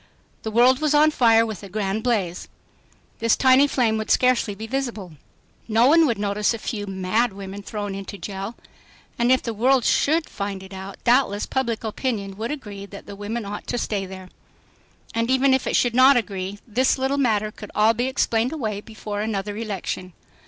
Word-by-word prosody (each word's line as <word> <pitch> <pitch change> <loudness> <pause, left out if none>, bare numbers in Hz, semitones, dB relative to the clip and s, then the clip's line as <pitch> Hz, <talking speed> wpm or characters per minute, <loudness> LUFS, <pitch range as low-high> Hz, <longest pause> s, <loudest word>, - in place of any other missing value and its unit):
The 220 - -4
world 245 +4 +4
was 305 -1 +2
on 305 +1 +5
fire 230 -5 +4
with 215 -5 -6
a 200 - -10
grand 205 +1 -2
blaze. 200 -8 -1 0.7
This 230 0 +2
tiny 265 +2 +5
flame 230 -6 +1
would 220 - -5
scarcely 250 -5 +2
be 220 +3 -7
visible. 225 -7 -4 0.6
No 225 +1 +4
one 320 +3 +6
would 235 -5 0
notice 205 +2 0
a - - -5
few 210 -2 -5
"mad" 195 +4 0
women 195 0 -7
thrown 205 -1 -5
into 195 +1 -7
jail. 195 +3 -6 0.6
And 240 +1 +3
if 260 - +3
the 230 - -3
world 250 +3 +2
should 315 +2 +2
find 200 -1 -5
it 190 0 -12
out, 190 +1 -8
doubtless 240 -4 +2
public 235 -4 -2
opinion 215 -3 -3
would 225 +2 -3
agree 205 -9 -7
that 200 0 -11
the 200 - -9
women 210 +3 -4
ought 205 +1 -7
to 245 - -2
stay 200 -4 -2
there. 185 -1 -10 0.8
And 230 +1 0
even 265 +1 +4
if 265 - +1
it - - 0
should 245 -2 +2
not 260 +2 +6
agree, 195 -3 -3
this 255 +5 +2
little 265 +2 0
matter 215 -5 +1
could 210 -1 -10
all 215 +2 +4
be 240 +3 -1
explained 245 -2 +1
away 215 -9 -3
before 210 -1 -6
another 205 -1 -3
election. 195 -4 -4
220 Hz, 190 wpm, -23 LUFS, 200-250 Hz, 0.8 s, one